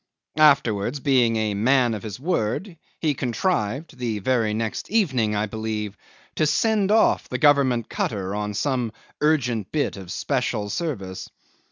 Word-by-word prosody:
Afterwards, 135 Hz, -5 st, +3 dB
being 130 Hz, -5 st, +3 dB
a 110 Hz, -1 st, 0 dB
man 120 Hz, +3 st, +3 dB
of 105 Hz, -, -4 dB
his 105 Hz, +1 st, -7 dB
word, 170 Hz, -, -1 dB, 0.2 s
he 155 Hz, -3 st, +1 dB
contrived 130 Hz, -, -2 dB
(the 115 Hz, -3 st, -2 dB
very 115 Hz, +1 st, +1 dB
next 110 Hz, 0 st, -3 dB
evening, 130 Hz, -, +1 dB
I 105 Hz, +1 st, +1 dB
believe) 110 Hz, -1 st, -4 dB, 0.4 s
to 155 Hz, -, +3 dB
send 205 Hz, +5 st, +2 dB
off 220 Hz, +1 st, +3 dB
the -, -, -2 dB
Government 135 Hz, -6 st, +3 dB
cutter 100 Hz, -3 st, -2 dB
on 105 Hz, 0 st, -3 dB
some 125 Hz, -2 st, -1 dB, 0.3 s
urgent 125 Hz, -9 st, +1 dB
bit 150 Hz, -8 st, -1 dB
of 95 Hz, -2 st, -9 dB
special 120 Hz, -6 st, -1 dB
service. 100 Hz, -, -4 dB
120 Hz, 145 wpm, -23 LUFS, 105-145 Hz, 0.4 s, Afterwards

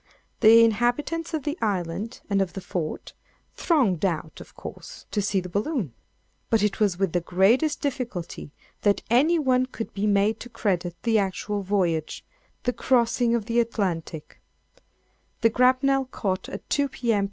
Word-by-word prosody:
The 225 Hz, +1 st, +8 dB
inhabitants 245 Hz, +10 st, 0 dB
of 305 Hz, -, -3 dB
the 300 Hz, +4 st, -3 dB
island, 200 Hz, +2 st, -2 dB
and 200 Hz, -1 st, +1 dB
of 190 Hz, -2 st, -2 dB
the -, -, -5 dB
fort, 170 Hz, -4 st, -4 dB, 0.4 s
thronged 240 Hz, -, +1 dB
out, 160 Hz, -4 st, -2 dB
of -, -, -14 dB
course, -, -, -10 dB
to 210 Hz, -, 0 dB
see 195 Hz, -1 st, +1 dB
the 180 Hz, -, -6 dB
balloon; 205 Hz, -, -2 dB, 0.6 s
but 225 Hz, -2 st, +3 dB
it 210 Hz, -2 st, 0 dB
was 200 Hz, -5 st, +2 dB
with 190 Hz, -3 st, 0 dB
the 175 Hz, -, +1 dB
greatest 205 Hz, -, +2 dB
difficulty 245 Hz, -, -4 dB, 0.3 s
that 205 Hz, -1 st, +2 dB
any 300 Hz, +8 st, +4 dB
one 255 Hz, -4 st, +2 dB
could 230 Hz, -3 st, -7 dB
be 205 Hz, +1 st, -1 dB
made 205 Hz, +2 st, +2 dB
to 245 Hz, -, -9 dB
credit 180 Hz, -6 st, -1 dB
the 225 Hz, -2 st, +3 dB
actual 200 Hz, +1 st, -2 dB
voyage—the 190 Hz, -, -3 dB
crossing 240 Hz, -1 st, +2 dB
of 225 Hz, -3 st, -2 dB
the 235 Hz, +1 st, +1 dB
Atlantic. 180 Hz, -9 st, -3 dB, 1.0 s
The 230 Hz, -1 st, +4 dB
grapnel 260 Hz, +3 st, +3 dB
caught 195 Hz, -7 st, -3 dB
at 195 Hz, -, -8 dB
2, 285 Hz, -1 st, +2 dB
P.M. 235 Hz, -5 st, 0 dB
215 Hz, 155 wpm, -25 LUFS, 190-250 Hz, 1.0 s, The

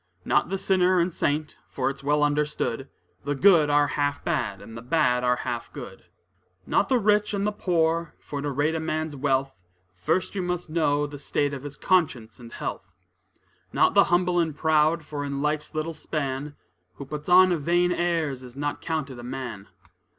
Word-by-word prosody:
Not -, -, +2 dB
the 195 Hz, -, -1 dB
sinner 185 Hz, -1 st, +3 dB
and 170 Hz, 0 st, +1 dB
saint, 150 Hz, 0 st, -1 dB
for 130 Hz, -, -2 dB
it's 140 Hz, 0 st, -4 dB
well 150 Hz, +1 st, +2 dB
understood, 145 Hz, -3 st, -1 dB, 0.3 s
The 145 Hz, +1 st, -1 dB
good 165 Hz, -2 st, +5 dB
are 145 Hz, 0 st, +4 dB
half 145 Hz, +1 st, -1 dB
bad, 100 Hz, -4 st, -1 dB
and 110 Hz, +3 st, -11 dB
the 115 Hz, -, -7 dB
bad 125 Hz, -2 st, +1 dB
are 125 Hz, 0 st, +3 dB
half 120 Hz, -1 st, -4 dB
good. -, -, -10 dB, 0.6 s
Not 200 Hz, -, +1 dB
the 260 Hz, -, +4 dB
rich 210 Hz, -1 st, +2 dB
and 200 Hz, 0 st, -1 dB
the 210 Hz, -, +1 dB
poor, 165 Hz, -4 st, 0 dB
for 145 Hz, -1 st, -6 dB
to 145 Hz, -, -2 dB
rate 145 Hz, +3 st, 0 dB
a 160 Hz, -, -1 dB
man's 155 Hz, -1 st, -2 dB
wealth, 135 Hz, -5 st, -1 dB, 0.5 s
You 190 Hz, +1 st, 0 dB
must 180 Hz, -1 st, -2 dB
first -, -, -24 dB
know 150 Hz, -3 st, +1 dB
the 145 Hz, -1 st, -8 dB
state 145 Hz, 0 st, -1 dB
of 135 Hz, -, -5 dB
his 145 Hz, 0 st, -7 dB
conscience 130 Hz, -13 st, 0 dB
and 120 Hz, -1 st, -11 dB
health. 95 Hz, -2 st, -6 dB, 0.8 s
Not -, -, +3 dB
the -, -, +6 dB
humble 175 Hz, 0 st, +2 dB
and 160 Hz, -3 st, 0 dB
proud, 155 Hz, +1 st, +2 dB
for 145 Hz, -1 st, -5 dB
in 140 Hz, 0 st, -3 dB
life's 150 Hz, 0 st, -2 dB
little 155 Hz, +2 st, -2 dB
span, 145 Hz, -2 st, -4 dB, 0.4 s
Who 140 Hz, -, -8 dB
puts 150 Hz, +3 st, -6 dB
on 185 Hz, 0 st, +7 dB
vain 175 Hz, +4 st, +2 dB
airs, 165 Hz, -6 st, 0 dB
is 125 Hz, -1 st, -12 dB
not 145 Hz, +1 st, -3 dB
counted 145 Hz, -6 st, -3 dB
a -, -, -9 dB
man. 125 Hz, -5 st, -6 dB
150 Hz, 185 wpm, -25 LUFS, 135-170 Hz, 0.8 s, on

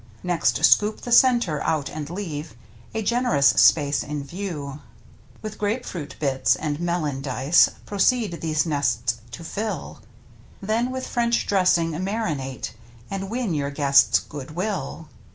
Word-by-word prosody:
Next 175 Hz, -2 st, +2 dB
scoop 210 Hz, +1 st, +3 dB
the 240 Hz, -, -6 dB
centre 235 Hz, -, +4 dB
out 155 Hz, -3 st, 0 dB
and 150 Hz, -1 st, -6 dB
leave 165 Hz, -, -6 dB, 0.4 s
A 220 Hz, -, -1 dB
gen'rous 205 Hz, -, +3 dB
space 145 Hz, -3 st, +4 dB
in 145 Hz, -1 st, -4 dB
view. 150 Hz, -4 st, -6 dB, 0.6 s
With 215 Hz, -1 st, -7 dB
grape 220 Hz, +4 st, -1 dB
fruit 160 Hz, -6 st, -6 dB
bits, 135 Hz, -3 st, +2 dB
and 150 Hz, -1 st, -3 dB
melon 170 Hz, -6 st, -2 dB
dice 135 Hz, +3 st, +4 dB, 0.2 s
Proceed 205 Hz, -2 st, +1 dB
these 155 Hz, -1 st, 0 dB
nests 130 Hz, -6 st, 0 dB
to 170 Hz, -, -9 dB
fill. 210 Hz, +6 st, -5 dB, 0.6 s
Then 225 Hz, +5 st, 0 dB
with 260 Hz, 0 st, -4 dB
French 235 Hz, -1 st, 0 dB
dressing 180 Hz, -4 st, +2 dB
marinate, 155 Hz, -, -3 dB, 0.4 s
And 195 Hz, 0 st, -4 dB
win 230 Hz, -5 st, -2 dB
your 140 Hz, -2 st, -1 dB
guests' 140 Hz, -7 st, +4 dB
good 135 Hz, -, -8 dB
will. 180 Hz, -4 st, -3 dB
165 Hz, 135 wpm, -23 LUFS, 145-205 Hz, 0.6 s, centre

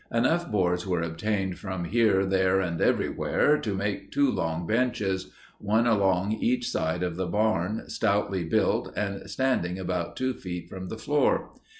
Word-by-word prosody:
Enough 160 Hz, +9 st, +1 dB
boards 90 Hz, -2 st, +1 dB
were 90 Hz, -3 st, 0 dB
obtained 95 Hz, +3 st, -2 dB
from 95 Hz, -3 st, -4 dB
here, 100 Hz, -1 st, +3 dB
there, 95 Hz, 0 st, +2 dB
and 85 Hz, -3 st, -2 dB
everywhere 150 Hz, 0 st, +2 dB
to 105 Hz, -4 st, -2 dB
make 100 Hz, +1 st, -3 dB
two 140 Hz, -2 st, +3 dB
long 80 Hz, +1 st, -2 dB
benches, 105 Hz, -4 st, 0 dB, 0.3 s
one 110 Hz, +3 st, +2 dB
along 100 Hz, -3 st, +2 dB
each 120 Hz, +3 st, 0 dB
side 80 Hz, +3 st, -1 dB
of 90 Hz, -2 st, -2 dB
the 95 Hz, -1 st, -1 dB
barn, 105 Hz, +1 st, 0 dB
stoutly 100 Hz, -4 st, 0 dB
built 80 Hz, -, +1 dB
and 100 Hz, -2 st, -3 dB
standing 95 Hz, -10 st, 0 dB
about 90 Hz, -2 st, -3 dB
two 130 Hz, 0 st, -1 dB
feet 90 Hz, -6 st, -6 dB
from 95 Hz, -1 st, -7 dB
the 110 Hz, -, -5 dB
floor. 145 Hz, +6 st, +1 dB
95 Hz, 160 wpm, -27 LUFS, 90-110 Hz, 0.3 s, here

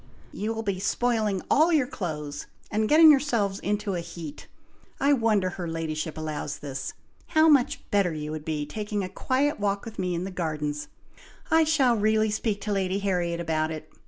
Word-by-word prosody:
"You 215 Hz, +2 st, -3 dB
will 225 Hz, 0 st, -3 dB
be 200 Hz, -3 st, -2 dB
spoiling 215 Hz, -2 st, 0 dB
all 320 Hz, +4 st, +4 dB
your 300 Hz, -5 st, +3 dB
clothes, 155 Hz, -, -5 dB, 0.2 s
and 215 Hz, +1 st, +1 dB
getting 315 Hz, +1 st, +9 dB
yourselves 235 Hz, -9 st, +1 dB
into 205 Hz, -1 st, -1 dB
a 175 Hz, -, -1 dB
heat! 165 Hz, -3 st, -8 dB, 0.5 s
I 280 Hz, +1 st, +4 dB
wonder 215 Hz, -7 st, +2 dB
her 175 Hz, -1 st, -5 dB
ladyship 160 Hz, -1 st, -3 dB
allows 155 Hz, -2 st, -4 dB
this! 135 Hz, -2 st, -5 dB, 0.3 s
How 315 Hz, -1 st, +4 dB
much 280 Hz, -5 st, +3 dB
better 200 Hz, -4 st, +3 dB
you 150 Hz, -1 st, -5 dB
would 155 Hz, -1 st, -5 dB
be 150 Hz, -2 st, -2 dB
taking 210 Hz, +2 st, -3 dB
a 185 Hz, -, -4 dB
quiet 275 Hz, +6 st, 0 dB
walk 200 Hz, 0 st, -1 dB
with 225 Hz, -2 st, -9 dB
me 180 Hz, -1 st, -1 dB
in 170 Hz, -, -2 dB
the 190 Hz, -, -5 dB
gardens! 150 Hz, -4 st, -3 dB, 0.6 s
I 320 Hz, 0 st, +5 dB
shall 275 Hz, -6 st, +3 dB
really 215 Hz, 0 st, +2 dB
speak 210 Hz, -1 st, -1 dB
to 210 Hz, -, -3 dB
Lady 190 Hz, -1 st, 0 dB
Harriet 180 Hz, -4 st, -1 dB
about 160 Hz, -2 st, 0 dB
it! 155 Hz, -1 st, -7 dB
195 Hz, 185 wpm, -26 LUFS, 160-225 Hz, 0.6 s, getting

